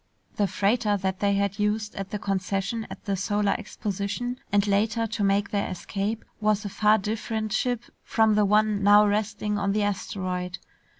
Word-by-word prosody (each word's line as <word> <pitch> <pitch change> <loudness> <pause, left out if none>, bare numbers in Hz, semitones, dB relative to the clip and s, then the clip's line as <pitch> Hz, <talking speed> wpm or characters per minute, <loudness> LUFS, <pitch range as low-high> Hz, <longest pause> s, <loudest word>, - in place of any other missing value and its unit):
The 205 - +2
freighter 205 +2 +1
that 190 -1 -2
they 200 -1 +2
had 200 0 -1
used 210 0 0
at 195 -1 -5
the 210 - -3
concession 195 +3 -2
at - - -10
the 200 -2 0
Solar 205 +2 +1
Exposition 210 +4 -4
and 205 0 +3
later 220 +3 +1
to 225 -1 -2
make 200 +1 +2
their 200 -1 0
escape 200 +4 -3
was 215 -1 +1
a - - -2
far 210 +2 +4
different 215 +1 -3
ship 245 +1 0 0.2
from 220 -1 +2
the 210 0 +4
one 210 0 +3
now 205 +1 +7
resting 210 0 -1
on 195 0 0
the 210 0 +1
asteroid. 185 -3 -3
205 Hz, 175 wpm, -26 LUFS, 200-215 Hz, 0.2 s, now